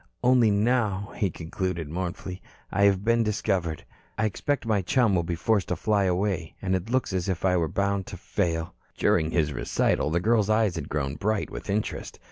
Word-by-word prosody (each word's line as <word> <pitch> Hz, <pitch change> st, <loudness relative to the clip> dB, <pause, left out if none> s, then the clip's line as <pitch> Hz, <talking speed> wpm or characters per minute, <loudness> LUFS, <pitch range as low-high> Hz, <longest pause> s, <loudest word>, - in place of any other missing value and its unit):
"Only 125 Hz, -2 st, +5 dB
now," 105 Hz, -2 st, +1 dB
he 100 Hz, -, +1 dB
concluded 85 Hz, 0 st, -4 dB
mournfully, 90 Hz, +2 st, -5 dB, 0.3 s
"I 100 Hz, -, +3 dB
have 100 Hz, 0 st, +3 dB
been 115 Hz, 0 st, +3 dB
discovered. 95 Hz, -6 st, -1 dB, 0.3 s
I 110 Hz, -, +1 dB
expect 140 Hz, +6 st, -1 dB
my 110 Hz, -3 st, +2 dB
chum 110 Hz, +3 st, +2 dB
will 90 Hz, -, +3 dB
be 85 Hz, +1 st, -3 dB
forced 100 Hz, +3 st, +1 dB
to 90 Hz, -, -1 dB
fly 100 Hz, +3 st, +1 dB
away. 90 Hz, -2 st, -1 dB
And 95 Hz, -1 st, 0 dB
it 95 Hz, +4 st, -3 dB
looks 130 Hz, -5 st, 0 dB
as 95 Hz, 0 st, -1 dB
if 95 Hz, 0 st, -1 dB
I 90 Hz, -1 st, +3 dB
were 85 Hz, -2 st, +2 dB
bound 100 Hz, +3 st, -1 dB
to -, -, -7 dB
fail." 80 Hz, -1 st, -2 dB, 0.2 s
During 80 Hz, -, +2 dB
his 80 Hz, -3 st, +1 dB
recital, -, -, +1 dB
the 85 Hz, +2 st, +1 dB
girl's 110 Hz, +1 st, +2 dB
eyes 110 Hz, -3 st, +3 dB
had 80 Hz, -5 st, -5 dB
grown 70 Hz, -1 st, -2 dB
bright 105 Hz, +3 st, -1 dB
with -, -, -7 dB
interest. 105 Hz, +2 st, -2 dB
95 Hz, 195 wpm, -26 LUFS, 85-110 Hz, 0.3 s, Only